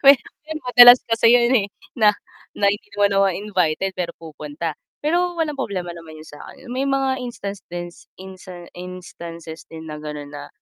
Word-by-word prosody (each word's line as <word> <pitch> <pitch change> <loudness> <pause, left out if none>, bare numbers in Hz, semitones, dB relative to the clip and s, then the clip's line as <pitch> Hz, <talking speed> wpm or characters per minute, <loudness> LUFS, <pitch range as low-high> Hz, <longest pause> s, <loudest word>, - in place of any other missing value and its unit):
mahirap 275 -1 +6
'yun, 315 0 -4
madalas 245 0 +9
kasi 230 0 +2
yun, 240 +1 +4
eh, - - -19 0.3
na 210 -2 +5 0.4
na 200 - +3
hindi 205 - -7
naman 200 0 +3
ako 195 - +5
invited 190 -2 0
pero 180 -2 -3
pupunta, 155 0 -6 0.3
pero 350 +2 +1
walang 310 -3 -1
problema 185 -8 -3
naman 165 -2 -11
yun - - -11
sakin, 145 - -12
yun 245 - -8
may 260 +2 -1
mga 270 -1 0
instancens 195 -7 -7
instans 185 -2 -11
instances 170 -2 -9
din 160 0 -9
na 150 0 -7
ganon 150 -1 -7
na, 145 0 -8
190 Hz, 170 wpm, -21 LUFS, 165-245 Hz, 0.4 s, madalas